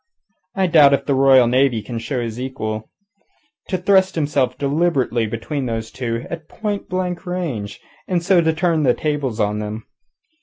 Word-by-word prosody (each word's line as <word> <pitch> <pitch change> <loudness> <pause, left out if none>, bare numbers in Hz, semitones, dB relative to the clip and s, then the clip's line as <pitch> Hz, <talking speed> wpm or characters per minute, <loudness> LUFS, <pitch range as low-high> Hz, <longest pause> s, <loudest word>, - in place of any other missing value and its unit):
I 190 -1 +2
doubt 150 -5 +6
if 140 - -6
the 140 - +1
Royal 135 -2 +6
Navy 125 -2 +2
can 115 +2 -5
show 125 +3 -3
his 115 0 -5
equal. 110 -5 -4 0.8
To 185 - -1
thrust 190 +1 +3
himself 145 -5 0
deliberately 140 -6 0
between 130 +5 -4
those 115 -1 -4
two, 115 -2 -4
at 165 -2 -8
point 210 -2 -4
blank 185 0 -3
range, 135 - -4 0.3
and 175 -2 0
so 180 -1 +4
turn 160 0 +1
the 130 -4 +3
tables 145 -7 -2
on 105 0 0
them! 105 +1 -5
140 Hz, 160 wpm, -20 LUFS, 115-170 Hz, 0.8 s, doubt